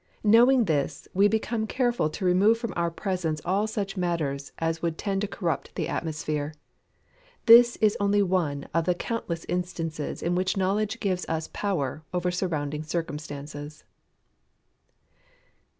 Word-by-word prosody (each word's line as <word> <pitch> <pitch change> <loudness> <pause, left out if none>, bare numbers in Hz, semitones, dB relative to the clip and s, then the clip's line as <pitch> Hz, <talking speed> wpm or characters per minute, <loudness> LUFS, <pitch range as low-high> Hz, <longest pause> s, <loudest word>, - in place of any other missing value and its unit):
Knowing 235 +3 +6
this, 145 -4 -1
we 200 +2 +5
become 220 +1 -1
careful 240 -10 +1
to 185 +5 -5
remove 195 +5 +4
from 230 0 -4
our 170 -1 +1
presence 170 -3 -2
all 195 +4 +1
such 200 -2 -3
matters 160 -6 -2
as 165 0 -1
would 165 -1 -1
tend 195 -2 -1
to 210 - -1
corrupt 170 -7 -3
the - - -2
atmosphere. 155 -2 -3 0.9
This 235 +1 +8
is 215 -1 +2
only 205 0 +3
one 165 -7 -1
of 165 0 +1
the 180 0 +2
countless 175 -5 -4
instances 165 -4 -3
in 170 - +1
which 185 +2 0
knowledge 205 +4 0
gives 185 -3 -1
us 160 0 -2
power 155 -7 -2
over 180 0 0
surrounding 155 -5 -2
circumstances. 150 -2 -5
180 Hz, 140 wpm, -27 LUFS, 155-205 Hz, 0.9 s, This